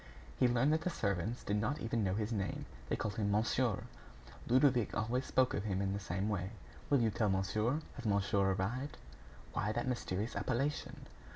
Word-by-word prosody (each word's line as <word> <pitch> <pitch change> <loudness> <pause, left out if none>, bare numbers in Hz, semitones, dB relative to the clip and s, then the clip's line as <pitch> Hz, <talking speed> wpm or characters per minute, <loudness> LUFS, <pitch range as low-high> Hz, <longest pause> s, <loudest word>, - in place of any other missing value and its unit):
He - - +6
learned 125 +5 +3
that 160 - +2
the 180 - 0
servants 100 - -1
did 105 - 0
not 125 +9 0
even 115 -2 0
know 95 -1 +1
his 110 +1 -1
name. 100 -4 -2 0.2
They - - +2
called 105 -2 -3
him 105 -2 +1
"monsieur." 110 +1 +1 0.6
Ludovic 125 -2 +4
always 120 +4 0
spoke 130 -1 +3
of 105 - -2
him 95 -3 0
in 100 0 0
the 100 - -2
same 95 +1 -2
way: 95 -3 -1 0.4
"You 140 - +5
will 115 -3 +2
tell 105 0 +1
monsieur. 105 +9 +1 0.2
Has 125 - -7
monsieur 100 -1 +2
arrived?" 120 +10 -2 0.6
Why 105 - 0
that 120 +3 -1
mysterious 110 -3 -2
appellation? 135 +4 -1
110 Hz, 185 wpm, -35 LUFS, 100-125 Hz, 0.6 s, He